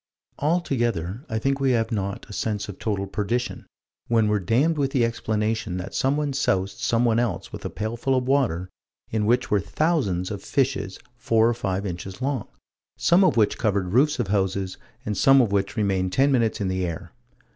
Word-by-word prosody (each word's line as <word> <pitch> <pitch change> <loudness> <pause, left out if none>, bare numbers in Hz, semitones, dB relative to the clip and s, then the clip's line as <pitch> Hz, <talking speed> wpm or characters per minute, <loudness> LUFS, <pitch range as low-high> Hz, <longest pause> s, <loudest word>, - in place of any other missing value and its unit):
Altogether 120 - 0
I 110 - -1
think 135 +4 0
we 135 -2 +2
have 115 -1 0
not 100 -3 -3
a - - -10
sense 105 -1 -2
of 100 - -8
total 100 -3 -1
perdition, 110 +5 -3 0.4
when 115 -2 +3
we're 105 0 +2
damned 130 - +2
with 135 -2 +1
the 125 -4 +3
explanation 110 -4 -1
that 90 - -6
someone 145 +1 0
soused 95 -8 0
someone 120 -1 +2
else 120 -3 -2
with - - -7
a - - -1
pailful 115 +5 -2
of 125 0 -1
water 125 -11 +1 0.4
in 105 -2 0
which 125 +2 +2
were 105 - +4
thousands 100 - 0
of 100 -2 -5
fishes 100 -9 -1 0.2
four 115 -1 +3
or 120 - +2
five 100 -4 -2
inches 90 +2 -6
long, 130 -4 -2 0.5
some 175 +3 +4
of 185 - +3
which 105 -2 +2
covered 100 -3 0
roofs 145 +5 +4
of 120 -7 -2
houses, 95 -1 0 0.3
and 105 - -2
some 135 +7 +6
of 120 -6 +3
which 100 +1 0
remained 95 -3 +1
ten 140 +2 +3
minutes 115 -4 +1
in 100 - -1
the 95 0 -1
air. 85 0 -5
110 Hz, 190 wpm, -24 LUFS, 100-130 Hz, 0.5 s, some